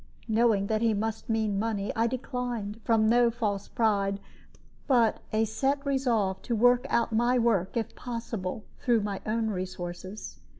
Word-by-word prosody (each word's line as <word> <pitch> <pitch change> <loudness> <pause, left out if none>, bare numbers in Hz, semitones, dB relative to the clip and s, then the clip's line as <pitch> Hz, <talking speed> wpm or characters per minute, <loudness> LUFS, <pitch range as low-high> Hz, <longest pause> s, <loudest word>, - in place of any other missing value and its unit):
Knowing 220 -3 +3
that 215 +1 0
he 225 -2 +2
must 220 +2 -3
mean 220 -3 +1
money, 210 -2 -1
I 230 +1 +2
declined, 240 -3 -4
from 225 -2 +3
no 240 +1 +5
false 210 -4 -2
pride, 200 -4 +1 0.7
but 240 -6 +3
a 220 +1 +2
set 275 +6 -1
resolve 235 -9 +1
to 235 - -2
work 245 +2 +4
out 235 0 +1
my 240 +3 +3
work, 225 -5 +1
if 225 - -3
possible, 230 -4 -5 0.2
through 235 -3 +2
my 200 -1 -3
own 220 +1 0
resources. 185 +1 -6
225 Hz, 155 wpm, -28 LUFS, 205-235 Hz, 0.7 s, no